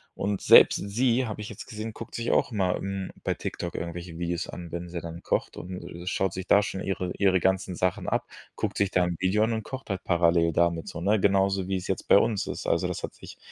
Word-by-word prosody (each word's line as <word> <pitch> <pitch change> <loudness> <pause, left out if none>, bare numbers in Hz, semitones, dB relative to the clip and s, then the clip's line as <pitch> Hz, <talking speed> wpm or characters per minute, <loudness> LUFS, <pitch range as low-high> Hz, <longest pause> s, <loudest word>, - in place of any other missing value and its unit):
Und 100 0 -2
selbst - - +8
sie, 120 +4 +2
habe 105 -1 -5
ich 105 - -6
jetzt 105 - -9
gesehen, 110 0 -6
guckt - - -9
sich 120 0 -1
auch - - +2
mal, 95 -5 +1
hm, 95 -1 -4
bei - - +1
TikTok 85 - -5
irgendwelche 85 0 -6
Videos 85 -1 -2
an, 85 -1 -7
wenn 85 +1 -5
sie 85 0 -4
dann 85 0 -8
kocht - - -1
und, 90 +1 -6
äh, 85 +1 -9
schaut 95 -1 0
sich 95 0 -6
da 100 - +6
schon 95 - -4
ihre 90 -1 -2
ihre 95 -2 +4
ganzen 95 -1 0
Sachen 90 0 -1
ab, - - -1 0.3
guckt - - -3
sich 100 -2 +1
da 90 - +3
'n 85 -1 -2
Video 95 +4 +2
an 115 - -1
und 110 -1 -2
kocht 130 -4 -8
halt 95 -2 -3
parallel 85 -1 +3
damit 85 0 +1
so, 85 - -7
ne? 105 +3 +3
Genauso 95 -1 +2
wie 95 -1 0
es 90 - -6
jetzt 95 - -2
bei - - +8
uns 105 -1 +1
ist. - - -5
Also - - +2
das - - -4
hat - - -5
sich - - -12
95 Hz, 250 wpm, -27 LUFS, 85-100 Hz, 0.3 s, selbst